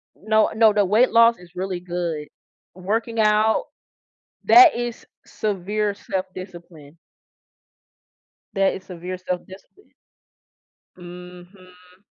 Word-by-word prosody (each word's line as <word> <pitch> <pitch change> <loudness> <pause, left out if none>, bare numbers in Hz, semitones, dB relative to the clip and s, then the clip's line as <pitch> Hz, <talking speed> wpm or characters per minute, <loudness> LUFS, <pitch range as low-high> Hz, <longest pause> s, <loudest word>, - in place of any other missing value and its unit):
No 215 +1 +1
no 220 -1 +5
no 205 -1 +2
weight 215 +7 +3
loss 230 0 +5
is 175 -1 -17
really 185 -1 -4
good. 175 -4 -4 0.5
Working 225 +5 -2
out, 215 +1 +2 0.8
that 360 -3 +7
is 240 -1 -5 0.2
severe 205 +1 -3
self-discipline. 180 -6 -8 1.6
That 195 0 +1
is 190 - -9
severe 180 0 -7
self-discipline. 185 - -9 1.0
Mhm. 180 +1 -14
190 Hz, 95 wpm, -22 LUFS, 180-215 Hz, 1.6 s, that